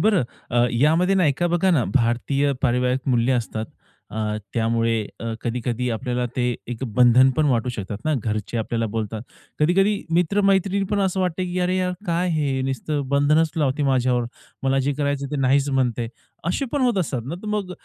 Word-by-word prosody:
बरं 205 - +3 0.3
अ, 120 0 +3
यामध्ये 160 +9 +3
ना 185 -3 +3
एका 150 +5 +1
बघा 175 +2 +2
ना, 150 -8 +3
भारतीय 135 +4 +1
पारिवारिक 125 0 +1
मूल्य 125 +1 +2
असतात 110 -2 -2 0.5
अ, 105 -1 -2 0.2
त्यामुळे 115 0 +1 0.2
अ, - - -6 0.2
कधी-कधी 120 +1 -2
आपल्याला 125 +2 -2
ते 125 -1 +1
एक 120 +1 -5
बंधन 125 +1 +6
पण 155 -1 +3
वाटू 125 -2 +1
शकतात 105 -3 -5
ना. 155 - +1
घरचे 110 -2 -3
आपल्याला 115 +1 -1
बोलतात. 110 0 -3 0.4
कधी-कधी 195 +6 +3 0.2
मित्र-मैत्रिणी 195 +2 +2
पण 205 -1 +1
असं 190 -1 0
वाटतं, 180 0 -1
की 180 0 -3
अरे, 180 +1 +1
यार 185 -1 0
काय 175 +2 0
हे 145 -5 0
नुसतं 135 +1 -2
बंधनच 150 +3 +3
लावते 145 -1 +1
माझ्यावर. 125 -2 +2 0.4
मला 135 0 +2
जे 145 - +2
करायचं 140 -1 -1
ते 150 - -2
नाहीच 135 +2 +3
म्हणते. 125 -3 0 0.4
असे 230 - 0
पण 290 - 0
होत 240 -6 +2
असतात 135 -9 -1
ना, 150 +6 -4
तर 215 - -8
मग 195 -3 -4
135 Hz, 180 wpm, -23 LUFS, 120-175 Hz, 0.5 s, बंधन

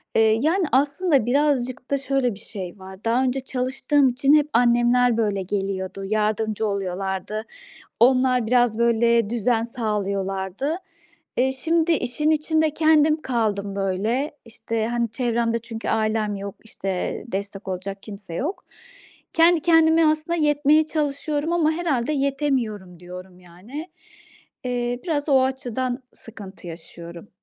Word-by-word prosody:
Eee, 220 0 +4
yani, 350 +4 +2
aslında 280 0 +2
birazcık 255 -1 0
da 280 - +3
şöyle 270 -3 0
bir - - -13
şey 200 -3 -8
var, 190 +1 -12
daha 235 +3 +2
önce 260 +1 0
çalıştığım 265 +2 +1
için 270 +3 +2
hep 300 -1 +5
annemler, 240 0 +4
böyle, 205 -3 0
geliyordu, 195 0 -3
yardımcı 215 +1 0
oluyorlardı, 195 +2 -3 0.6
onlar 255 -1 +4
biraz, 240 -1 +2
böyle, 235 -1 +3
düzen 235 0 +1
sağlıyorlardı. 200 - -2 0.6
Eee, 265 +1 +2
şimdi, 325 +5 +1
işin 300 0 0
içinde 315 0 +1
kendim 310 -1 +3
kaldım, 205 -5 -1
böyle. 205 +9 -1
İşte, 225 -1 -3
hani, 235 -1 -1
çevremde 230 -1 0
çünkü 230 -1 -7
ailem 215 -1 0
yok, 200 0 -6
işte, 195 -4 -4
destek 200 -1 -5
olacak 195 +2 -5
kimse 200 -5 -9
yok. 310 - -3 0.7
Kendi 335 0 +5
kendime 325 0 +5
aslında 310 +2 +1
yetmeye 300 0 +3
çalışıyorum 300 +1 -2
ama 330 -3 +3
herhâlde 305 -6 -1
yetemiyorum 265 - -1
diyorum, 180 +1 -10
yani. 205 - -9 0.7
Eee, 245 0 -2
biraz 310 -4 -1
o 265 -1 +5
açıdan 260 -1 -2
sıkıntı 200 -5 -12
yaşıyorum. 170 +2 -10
240 Hz, 125 wpm, -23 LUFS, 205-285 Hz, 0.7 s, hep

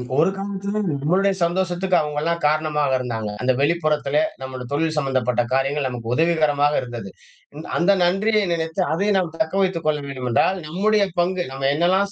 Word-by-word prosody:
ஒரு 160 +6 +4
காலத்ததுல 200 +1 -3 0.2
நம்மளுடைய 190 +6 +2
சந்தோஷத்துக்கு 180 +1 0
அவங்கலாம் 155 +3 -1
காரணமாக 150 -2 +1
இருந்தாங்க. 115 -4 -3
அந்த 130 +1 +2
வெளிப்புறத்திலே 155 - +1 0.2
நம்முடை 130 -1 -6
தொழில் 160 +2 0
சம்மந்தப்பட்ட 130 -4 0
காரியங்கள் 135 +2 +1
நமக்கு 120 -2 -5
உதவிகரமாக 155 -3 +2
இருந்தது. 120 -5 -7 0.7
அந்த 175 +3 +3
நன்றியை 205 +5 +2
நினைத்து 165 +1 -1
அதை 195 +6 0
நாம் 180 -3 -1
தக்க 160 +1 -1
வைத்துக் 180 -4 -1
கொள்ள 150 -1 +1
வேண்டுமென்றால் 130 +6 0
நம்முடைய 205 +6 +2 0.2
பங்கு 180 0 0
நம்ம 135 0 -2
என்னல்லாம் 190 +5 +2
160 Hz, 145 wpm, -22 LUFS, 140-185 Hz, 0.7 s, ஒரு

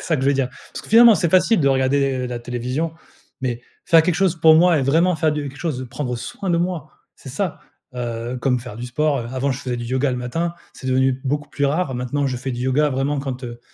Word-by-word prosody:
c'est - - -10
ça 160 - 0
que 130 - -3
je 135 - +2
veux - - +1
dire. 135 -2 0 0.2
Parce - - -6
que, - - -14
finalement, 230 +1 +8
c'est 170 0 +1
facile 185 +2 +4
de 140 - +3
regarder, 135 +1 +2
heu, - - -2
la 125 -1 -4
télévision, 125 +7 -3 0.5
mais 120 -2 -2 0.2
faire 165 -1 +6
quelque 175 +1 +1
chose 185 -3 +2
pour 160 -1 +7
moi 175 -1 +5
et - - 0
vraiment 165 +6 +3
faire 155 0 +1
du 150 -2 -3
quelque 135 - -12
chose 160 -7 -2
de 130 - -5
prendre 125 0 -4
soin 190 - -6
de 170 - +3
moi, 170 -3 -2 0.3
c'est - - -12
ça, 180 +5 -3 0.3
heu, 120 0 -4
comme 125 -2 +1
faire 120 -3 -9
du 120 +2 -6
sport, 145 +3 0
heu, 115 - -6
avant, 130 +2 -1
je 130 - -5
faisais 125 -2 -3
du 120 - -5
yoga 130 +2 0
le - - -2
matin, 165 +8 -2 0.2
c'est 130 - -9
devenu 130 0 +2
beaucoup 145 +2 -2
plus 145 - -1
rare. 145 -1 -1
Maintenant, 125 +3 -1
je 130 -2 -2
fais 130 +1 -4
du 120 - -5
yoga 145 +3 +2
vraiment 135 +2 -1
quand, 130 -2 -5
heu, 120 -1 -8
135 Hz, 265 wpm, -21 LUFS, 125-160 Hz, 0.5 s, finalement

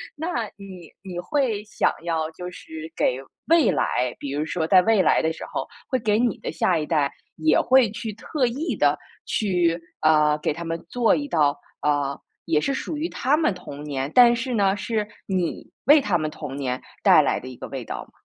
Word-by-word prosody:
那 290 - -3
你 190 -4 -11
你 180 -3 -6
会 230 +1 0
想 210 -1 +1
要 160 -2 -1
就 180 +2 -7
是 160 -3 -9
给 125 - +1 0.3
未 325 -7 +5
来 125 0 0
比 140 - -5
如 145 +2 -1
说 160 0 -2
在 185 +3 +6
未 220 -1 +4
来 - - +3
的 160 0 0
时 - - -9
候， - - -3 0.2
会 260 -4 +1
给 215 -2 +1
你 240 -3 +1
的 - - -5
下 180 - +1
一 155 - -2
代 150 -3 +1 0.2
也 155 -1 +3
会 255 -2 +4
去 220 0 -5
特 255 +6 -1
意 275 +8 -2
地 - - +3 0.3
去， 175 -5 +1 0.2
呃， 150 -1 +4
给 150 - -1
他 170 +3 -7
们 165 0 -4
做 240 -2 +3
一 290 - -3
道， 145 - +2 0.2
呃， 145 -2 0 0.3
也 160 -2 +2
是 275 - 0
属 290 - -4
于 320 +4 -2
他 270 +4 +1
们 310 -9 +2
童 145 -5 -9
年， 140 -2 -3
但 245 -1 +8
是 245 +2 -3
呢， 200 -3 +2
是 210 +1 -2 0.2
你 185 -3 -2 0.2
为 295 +2 +8
他 200 -8 +1
们 155 -1 -2
童 145 -3 -7
年 130 -2 -2 0.2
带 - - +7
来 - - 0
的 130 - -10
一 130 - -8
个 - - -7
味 135 -2 -5
道 - - -5
吗？ - - -27
180 Hz, 225 characters per minute, -24 LUFS, 155-235 Hz, 0.3 s, 但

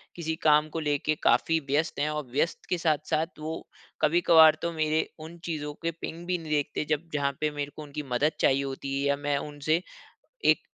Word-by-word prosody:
किसी 160 -2 -2
काम 150 0 +5
को 165 - -4
लेके 150 0 0
काफ़ी 165 0 +3
व्यस्त 145 +3 0
हैं 150 +1 +1
और 150 0 -2
व्यस्त 145 +6 -1
के 180 - +1
साथ-साथ 155 0 0
वो 160 +1 -5 0.3
कभी-कभार 160 -1 +6
तो 170 - -1
मेरे 155 0 +1
उन 160 +2 -9
चीज़ों 150 -3 -3
के 165 - 0
पिंग 170 +2 -6
भी 180 0 +1
नहीं 160 -2 -8
देखते 150 0 0
जब 155 +2 0
जहाँ 140 -1 +1
पे 155 0 +1
मेरे 145 -1 -4
को - - -8
उनकी 150 +1 -6
मदद 145 +5 +3
चाहिए 135 +1 +3
होती 135 0 -4
है 140 +1 0
या 140 - +3
मैं 145 0 0
उनसे 150 +3 -1 0.6
1 - - +4
155 Hz, 200 wpm, -28 LUFS, 145-160 Hz, 0.6 s, कभी-कभार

